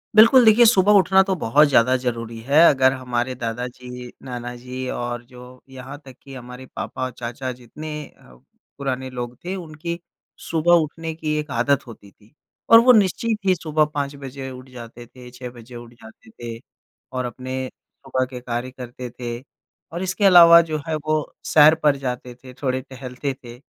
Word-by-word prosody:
बिल्कुल, 230 +4 +8
देखिए 225 +2 +7
सुबह 205 -3 +5
उठना 190 -1 +5
तो 195 - +1
बहुत 145 +7 +4
ज़्यादा 130 -2 +4
ज़रूरी 115 -2 -4
है। 145 +3 +4
अगर 130 -2 +4
हमारे 125 -1 -3
दादा 120 0 -4
जी, 125 0 -10
नाना 125 -1 -6
जी 125 +1 -7
और 120 0 -4
जो 125 0 -14
यहाँ 130 +2 -9
तक 130 -2 -12
कि 135 - -12
हमारे 125 +1 -10
पापा - - -5
और 130 - -5
चाचा 120 +2 -5
जितने 125 +5 -10 0.3
अ, 60 - -19 0.4
पुराने 130 -2 -3
लोग 125 -1 -6
थे, 185 +2 -3
उनकी 170 0 -6 0.5
सुबह 165 +1 +2
उठने 160 +1 -6
की 155 -1 -3
एक 150 -1 -6
आदत 140 +3 0
होती 100 -3 -13
थी 105 +2 -26 0.4
और 230 - +10
वो 250 +2 +6
निश्चित 215 +1 +2
ही 185 -1 +4
सुबह 155 -2 +1
5 140 0 -2
बजे 135 -1 -8
उठ 130 +1 -11
जाते 120 -1 -11
थे, 125 +1 -14
6 125 0 -8
बजे 120 +1 -13
उठ 120 0 -11
जाते 110 0 -16
थे 115 +1 -8 0.5
और 130 -1 -3
अपने 130 +2 -5
सुबह 130 0 -5
के 125 -1 -7
कार्य 120 +1 -4
करते 125 -1 -8
थे 120 -1 -4 0.6
और 175 +2 -3
इसके 190 +2 -1
अलावा 170 -3 +9
जो 155 - -1
है, 160 - -1
वो 155 0 -2 0.2
सैर 155 +1 +7
पर 145 -2 +4
जाते 125 0 -4
थे, 130 +1 -14
थोड़े 130 0 -2
टहलते 130 +1 -6
थे। 120 0 -11
130 Hz, 180 wpm, -22 LUFS, 125-155 Hz, 0.6 s, और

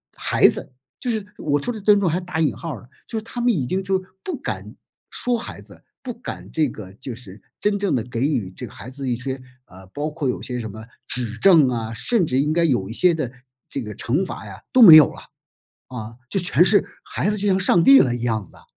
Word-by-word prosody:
孩 - - +4
子， - - 0 0.3
就 245 - -2
是 215 -3 -2
我 145 -1 0
说 245 - -1
的 220 - -6
“尊 205 0 +5
重” 190 - 0
还 175 +4 -1
打 180 -2 -5
引 155 -4 +1
号 165 -3 -6
了。 120 - -18 0.2
就 225 - -3
是 - - -11
他 240 +1 -6
们 245 0 +3
已 145 - -1
经 190 +5 -1
就 190 0 0 0.2
不 350 -7 -4
敢 - - -6 0.3
说 245 -1 0
孩 230 - -7
子， - - -14 0.2
不 250 -3 -6
敢 235 - -8
这 155 -4 +1
个 95 -4 -10
就 130 +3 -7
是 105 -4 -12 0.2
真 205 -1 +1
正 200 -1 0
地 115 - -1
给 120 -1 -5
予 130 -10 0
这 125 - -6
个 105 - -12
孩 125 - -10
子 135 -1 -4
一 120 - 0
些， 130 +1 -5 0.2
呃， 95 +1 -15
包 145 +10 -4
括 150 -4 -3
有 - - -3
些 125 -1 -4
什 110 -2 -6
么 110 +1 -10 0.2
指 115 -2 +1
正 160 -3 +6
啊， 115 -2 -3
甚 175 - +2
至 130 -2 0
应 150 +2 +1
该 170 0 +2
有 120 -12 +1
一 110 - -7
些 180 +6 +4
的 150 -7 -3 0.4
这 135 - -4
个 105 -2 -7
惩 145 +11 -1
罚 110 - -8
呀 100 0 -11
都 255 - +4
没 170 -8 +11
有 155 - +8
了， - - -12 0.7
啊， 115 -2 -8
就 - - -2
全 175 0 +3
是 205 - +4 0.2
孩 200 - -1
子 210 - -1
就 205 +1 -1
像 190 -1 +3
上 180 -2 +4
帝 275 0 +8
了 125 -3 +3
一 120 0 -4
样 110 -6 -2
的 - - -19
啊。 - - -19
145 Hz, 270 characters per minute, -22 LUFS, 120-190 Hz, 0.7 s, 没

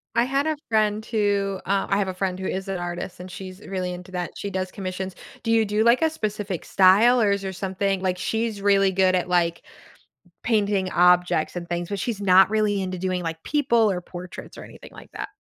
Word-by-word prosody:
I 235 +1 +3
had 275 +3 0
a 310 -1 -1
friend 215 -1 +1
who 200 -3 0
uh, 195 0 0
I 195 - +2
have 200 -2 0
a 185 - -3
friend 185 0 -2
who 190 - -5
is 190 +1 -3
an 195 -1 -2
artist, 175 +1 -5
and 180 0 -9
she's 185 +1 -9
really 185 -2 -3
into 180 +1 -10
that, 180 -1 -3
she 200 - -5
does 185 0 -2
commissions. 185 -1 -5 0.3
Do 225 - -1
you 225 -1 +4
do 210 +1 +1
like 235 +7 +4
a 320 - +4
specific 210 - -4
style, 205 +6 +5
or 205 -3 +3
is 200 0 0
there 190 -1 -4
something 195 +1 -1
like, 185 -1 0
she's 220 0 -2
really 195 -1 +4
good 185 0 +3
at, 180 0 0
like, 170 -1 +1 0.8
painting 205 -4 +1
objects 180 -2 +3
and 175 -1 -6
things, 175 +1 -3
but 200 - -2
she's 215 0 -3
not 190 -1 +6
really 210 -2 +1
into 185 -1 -3
doing, 185 0 -2
like, 165 -1 -5
people, 235 -7 +2
or 180 -2 -2
portraits, 180 0 -10
or - - -9
anything - - -13
like - - -13
that. - - -5
195 Hz, 220 wpm, -24 LUFS, 185-210 Hz, 0.8 s, not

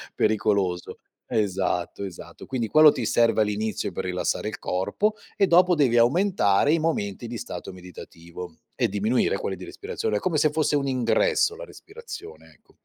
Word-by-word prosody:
pericoloso. 100 -4 0 0.3
Esatto, 95 -2 -1
esatto. 95 -3 -9
Quindi, 120 -4 -2
quello 155 +3 +7
ti 125 - -4
serve 115 -1 +3
all'inizio 105 -1 -1
per - - -4
rilassare 90 +3 -2
il - - -8
corpo, 200 - -1 0.2
e 195 - +3
dopo 180 +1 +5
devi 130 -6 +3
aumentare 140 - +3
i 165 - +2
momenti 120 -10 -2
di 120 +1 -5
stato 120 - -7
meditativo 90 -1 -10 0.2
e - - +1
diminuire 105 +2 0
quelli 95 - -3
di 90 0 -10
respirazione, 105 -1 -3
come 170 - -1
se 150 0 +3
fosse 155 -1 +1
un 140 -1 0
ingresso, 440 - +1
la - - -8
respirazione, 455 -1 -11
ecco. - - -27
115 Hz, 160 wpm, -25 LUFS, 95-155 Hz, 0.3 s, quello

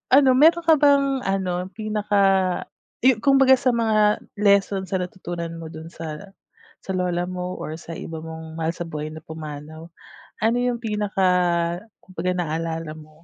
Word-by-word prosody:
Ano 270 -1 +6
meron 325 +6 +5
ka 320 0 +6
bang 275 -2 +4
ano, 185 -2 -1
pinaka 210 -2 0 0.8
yu 255 -4 +5
kumbaga 270 0 +5
sa 255 -3 +2
mga 215 -2 +2 0.2
lesson 200 -2 +3
sa 190 - -1
natutunan 175 -2 -5
mo 160 - -7
do'n 160 +1 -10
sa 165 +5 -8 0.5
sa - - -10
lola 180 -1 -1
mo 180 0 -4
or 155 - -5
sa 165 0 -10
iba 160 -1 -7
mong 160 0 -8
mahal 165 0 -1
sa 170 -1 -6
buhay 155 0 -5
na 160 - -8
pumanaw, 155 +1 -9 0.6
ano 230 +2 +3
yung 245 -1 0
pinaka 210 -3 -3 0.9
kumbaga 180 0 -3
naalala 165 -1 -3
mo? 155 0 -13
180 Hz, 155 wpm, -23 LUFS, 160-220 Hz, 0.9 s, Ano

